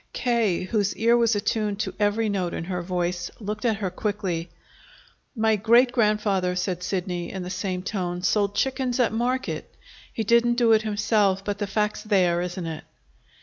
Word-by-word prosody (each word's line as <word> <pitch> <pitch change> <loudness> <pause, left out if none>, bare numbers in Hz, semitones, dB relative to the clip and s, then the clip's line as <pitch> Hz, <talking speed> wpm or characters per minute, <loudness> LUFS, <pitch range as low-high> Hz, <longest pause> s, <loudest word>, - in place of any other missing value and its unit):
K., 230 -8 +1
whose 205 +1 0
ear 230 +2 +3
was 235 -2 +3
attuned 205 0 -1
to - - -3
every 210 +2 +1
note 190 -4 -1
in - - -4
her 180 0 -3
voice, 175 0 -2
looked 210 +1 -5
at 225 -2 +3
her 195 -3 -3
quickly. 185 -4 -3 0.9
"My 220 -1 +3
great 235 +4 +4
grandfather," 210 -5 +1
said 180 -1 -2
Sidney 180 -2 -3
in 190 -2 -5
the 180 - -6
same 185 -1 -3
tone, 180 -3 -3
"sold 205 0 +1
chickens 260 -2 0
at 240 -3 +2
market. 250 +3 -2 0.4
He 225 - -2
didn't 235 +2 +3
do 235 -2 +3
it 220 -1 +5
himself; 205 -2 +1
but 205 -1 -3
the 205 - -2
fact's 210 +1 -1
there, 180 -5 +2
isn't 180 0 -4
it?" 160 -1 -5
205 Hz, 175 wpm, -25 LUFS, 180-225 Hz, 0.9 s, it